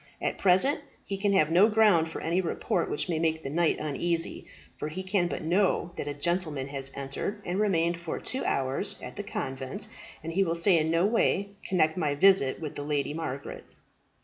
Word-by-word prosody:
At - - -2
present 195 - +4 0.3
he 200 - -3
can 200 +1 0
have 155 -5 +3
no 190 +6 +6
ground 210 -7 +4
for - - -6
any 170 +3 +1
report 170 - -1
which - - -1
may 165 -3 -1
make 160 -1 0
the 135 - -4
knight 170 +1 +2
uneasy, 165 +3 -2 0.3
for - - -3
he 175 +5 -5
can 185 -2 +1
but - - -4
know 175 +1 +1
that - - -5
a 145 - -2
gentleman 155 -3 -1
has 135 -1 -3
entered, 140 +9 -4
and 180 +3 -2
remained 170 -5 +1
for 170 -1 -4
two 260 - -2
hours 135 0 0
at - - -8
the - - -4
convent, 130 0 -4 0.4
and 165 +1 -5
he 195 +3 +3
will 170 -2 -1
in 165 -5 +4
no 165 +3 +3
way 200 -2 +1
connect 160 -3 +1
my 150 -5 0
visit 165 -5 +4
with 155 -3 -5
the - - -5
Lady 145 -1 -1
Margaret." 140 -4 -5
165 Hz, 200 wpm, -28 LUFS, 150-190 Hz, 0.4 s, no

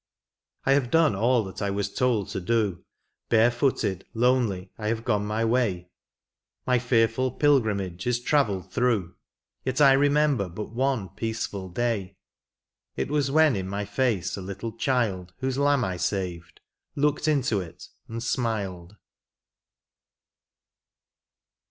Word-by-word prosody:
I 135 - +3
have 135 -3 +3
done 160 -7 +3
all 120 +3 +2
that 95 -1 -8
I 100 - 0
was 100 0 -2
told 120 -6 +1
to 95 - -4
do: 105 -2 0 0.5
Barefooted, 115 -4 +2
lonely, 115 -6 +1
I 105 - -5
have 115 +1 -2
gone 105 -4 0
my 110 +2 0
way. 105 -7 0 0.7
My 125 -1 +3
feariiil 120 +1 +1
pilgrimage 105 - +1
is 120 -1 +1
travelled 105 - 0
through, 110 -8 0 0.5
Yet 130 +1 -2
I 140 -2 +7
remember 145 -6 +2
but 105 +5 -7
one 125 -5 -1
peaceful 100 -2 -4
day. 100 -3 -2 0.8
It - - -3
was 145 -2 +1
when 155 -1 +4
in 95 -1 -3
my 100 +1 -3
face 105 -5 0
a 100 - -6
little 100 +5 -5
child 110 -8 -1
Whose 130 0 -2
lamb 140 -3 +3
I 95 -1 -3
saved, 90 -1 -3 0.3
looked 150 +1 +1
into 135 -8 +2
it 85 -3 -10 0.2
and 115 +1 -5
smiled. 105 -7 -2
115 Hz, 135 wpm, -26 LUFS, 95-130 Hz, 0.8 s, I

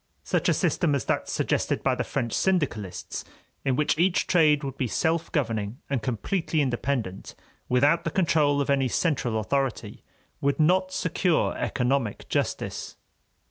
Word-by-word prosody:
Such - - 0
a - - +4
system 150 -5 +1
as 140 - -2
that - - -1
suggested - - 0
by - - +2
the - - -1
French 115 -2 -3
syndicalists, 135 - -1 0.4
in 135 -2 +1
which 150 +2 +1
each 180 +1 +3
trade 155 -4 +4
would 135 -1 -4
be 130 - -1
self 160 +7 0
governing 115 -6 -1
and 135 -4 0
completely 155 - -1
independent, 120 -7 -2 0.3
without 145 +7 +3
the 165 - -1
control 150 -5 +2
of 140 - 0
any 135 -2 +2
central 125 -5 0
authority, 135 +3 -2 0.4
would 140 +1 +1
not 185 +4 +3
secure 180 -1 +1
economic 125 -4 -1
justice. - - -2
140 Hz, 145 wpm, -26 LUFS, 125-165 Hz, 0.4 s, a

